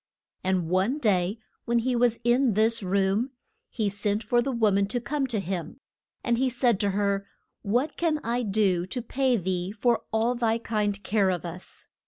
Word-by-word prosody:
And 185 -3 0
one 190 - +1
day 200 -6 +1 0.3
when 235 0 +1
he 250 +2 +1
was 240 -1 +3
in 240 -1 +3
this 225 +2 +2
room, 200 +6 0 0.4
he 220 -4 -1
sent 205 +2 -1
for 240 +3 +2
the 270 +3 -2
wo 225 -4 +2
man 200 0 +2
to 245 +4 -1
come 275 +2 -2
to 230 -4 -1
him. 185 - -4 0.4
And 235 -1 +1
he 260 0 +2
said 240 -4 +1
to 205 -2 +1
her, 200 0 0 0.3
What 245 +9 0
can 330 -3 +1
I 240 +2 0
do 195 -5 +1
to 245 +6 -3
pay 255 0 +1
thee 185 -1 -2
for 230 +2 +1
all 225 +2 +2
thy 230 -2 +1
kind 210 -3 -2
care 205 -3 +2
of 180 -2 -2
us? 175 +2 -8
220 Hz, 190 wpm, -26 LUFS, 195-240 Hz, 0.4 s, was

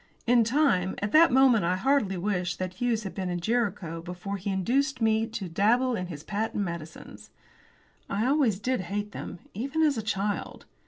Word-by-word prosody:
In 240 -1 +5
time! 230 -7 +2
At 205 0 -3
that 330 +2 +6
moment 255 -5 +5
I 175 +2 +1
heartily 210 -2 +1
wished 180 -1 -1
that 185 -1 -4
Hughes 230 +2 -1
had 190 - -6
been 185 -2 -3
at 175 0 -2
Jericho 200 -6 -1
before 180 +3 -5
he 195 +2 -4
induced 250 +9 0
me 220 0 +2
to 225 -4 -5
dabble 235 +9 +2
in 180 -4 -3
his 155 -4 -8
patent 210 +1 -2
medicines. 170 -3 -8 0.8
I 205 +3 0
always 265 -7 +2
did 250 +2 -1
hate 205 +3 -4
them, - - -7 0.2
even 275 +9 -1
as 290 -6 +2
a - - -2
child. 205 -1 -3
205 Hz, 180 wpm, -27 LUFS, 185-245 Hz, 0.8 s, that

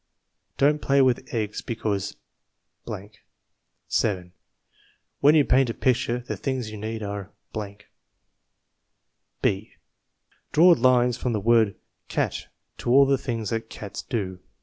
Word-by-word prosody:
Don't 150 +2 +3
play 140 0 +3
with 130 +3 +1
eggs 110 -4 -2
because. 105 -4 -3 1.7
7. 90 -5 -1 0.9
When 145 +2 +6
you 150 -3 +5
paint 130 -1 +3
a 115 - -3
picture, 125 -1 +1
the 120 - -5
things 130 -5 -3
you 110 - -7
need 110 +1 -4
are. 100 -1 -5 2.1
b. 100 +2 0 0.8
Draw 175 +4 +7
lines 125 -4 +3
from 125 - -2
the 105 - 0
word 110 -1 +3 0.3
cat - - -2 0.3
to - - -3
all 135 +3 +7
the 135 -1 +2
things 115 -6 -3
that 115 0 -3
cats 100 -2 -7
do. 95 -6 -3
115 Hz, 125 wpm, -25 LUFS, 105-130 Hz, 2.1 s, Draw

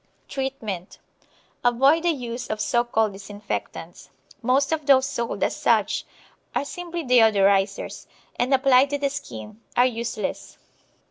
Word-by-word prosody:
Treatment 235 -10 -5 0.7
Avoid 270 +7 +4
the 345 - +1
use 245 -5 -3
of 215 - -3
so 240 +3 +2
called 220 -3 0
disinfectants. 205 +1 -7 0.3
Most 265 +4 +2
of 310 -2 -2
those 265 -1 +6
sold 235 -4 -3
as - - 0
such - - +1 0.5
are - - 0
simply 345 +2 -5
deodorisers, 200 -6 +3 0.3
and, 250 +2 -1
applied 270 0 +5
to 285 - -1
the 280 -1 -1
skin, 125 - -8 0.2
are 245 - +6
useless. 230 -4 -4
245 Hz, 130 wpm, -24 LUFS, 215-275 Hz, 0.7 s, those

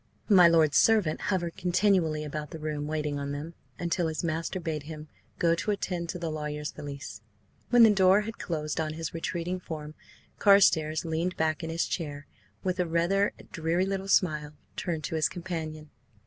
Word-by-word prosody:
My 185 -4 +8
lord's 160 -3 +4
servant 210 -9 +3
hovered 175 -4 -1
continually 180 -4 +2
about 150 0 -5
the - - -7
room, 150 -1 -3
waiting 150 -2 -2
on 140 0 -3
them, 150 +4 -6 0.2
until 170 0 0
his 160 +1 -3
master 165 +2 -2
bade 160 -3 -3
him 155 -1 -8 0.3
go 170 -1 +3
to 170 - -2
attend 180 -4 -2
to 180 - -3
the 170 -2 -3
lawyer's 150 -1 -4
valise. 140 -5 -8 0.5
When 245 -1 +7
the 220 - +8
door 190 +1 +5
had 225 +2 -7
closed 155 -2 -2
on 155 -1 -2
his 160 -1 -5
retreating 170 +2 -3
form, 155 -3 -7 0.5
Carstares 165 -6 +4
leaned 165 +3 -2
back 160 +1 0
in 160 - -4
his 165 +1 0
chair, 145 -4 -4
and, - - -35
with 185 -1 -1
a 180 - +1
rather 170 +5 +2 0.2
dreary 165 +3 0
little 195 0 -3
smile, 150 -6 +1 0.2
turned 165 -3 -3
to 140 - -4
his 155 - +2
companion. 160 -4 -6
165 Hz, 180 wpm, -28 LUFS, 155-180 Hz, 0.5 s, My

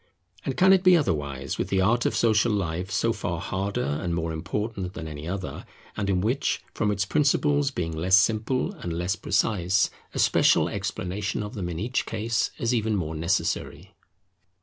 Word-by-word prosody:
And 135 - -3
can 190 +1 +6
it 190 -1 +3
be 185 -2 +7
otherwise 70 - -2
with - - 0
the 95 - +1
art 115 +6 +3
of - - -2
Social 110 0 +3
Life, 90 -2 -2
so 105 +3 +1
far 90 -6 -3
harder 95 +2 -2
and 75 +5 -2
more 85 -1 -2
important 95 +3 -4
than 80 - -6
any 75 0 -7
other, 95 +1 -5 0.3
and 100 -1 -2
in 90 -2 +2
which, 125 +8 0
from 105 - 0
its 100 -2 0
principles 145 +3 +2
being 85 - -3
less 90 +4 +4
simple 115 +5 +1
and 85 - -5
less 90 +4 -1
precise, 95 -2 +1 0.2
a - - -3
special - - +4
explanation 100 +3 -3
of 105 +2 -7
them 95 -7 -4
in 85 - -4
each 120 +9 -1
case 110 +1 0
is 115 +1 0
even 110 -2 +1
more 80 -5 -2
necessary? 80 +3 -2
100 Hz, 180 wpm, -26 LUFS, 85-115 Hz, 0.3 s, be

